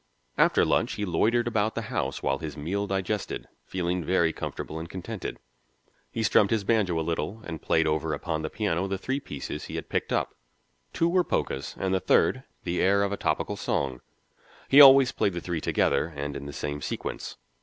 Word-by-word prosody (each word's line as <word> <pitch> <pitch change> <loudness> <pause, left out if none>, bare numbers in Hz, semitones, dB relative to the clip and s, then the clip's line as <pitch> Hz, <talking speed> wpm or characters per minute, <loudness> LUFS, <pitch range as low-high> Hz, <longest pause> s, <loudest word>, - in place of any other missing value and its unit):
After - - +4
lunch - - +1
he 105 - -2
loitered 115 +7 +2
about 110 -1 0
the - - -2
house - - -2
while 70 0 0
his 80 -2 -6
meal 95 +7 -2
digested, 95 +1 -2 0.2
feeling 90 -1 -1
very 85 -1 +2
comfortable 80 - -5
and 80 +1 -7
contented. 95 +3 -6 0.7
He 115 - -2
strummed 105 -2 +4
his 110 -3 +1
banjo 100 -6 +1
a 80 - -2
little 85 +6 -3
and 80 -3 -6
played 80 0 +2
over 80 +1 0
upon 80 -3 -3
the 80 - -3
piano 95 -4 -1
the 95 0 -2
three 135 +8 -2
pieces 75 - -6
he - - -7
had - - -5
picked - - -1
up: - - 0 0.6
two 165 - +1
were 180 +1 +3
polkas, 70 - -2
and 95 0 -1
the 95 - +2
third, - - +3 0.2
the 85 - -1
air 100 +1 +4
of 100 - -1
a - - 0
topical - - -1
song; 65 -2 -2 0.7
he 140 +2 +8
always 135 -2 +9
played 100 - 0
the 85 - -3
three 85 -2 -3
together - - +1
and 70 0 -4
in 70 - -6
the - - -6
same 75 +1 -4
sequence. - - -5
90 Hz, 195 wpm, -27 LUFS, 80-105 Hz, 0.7 s, always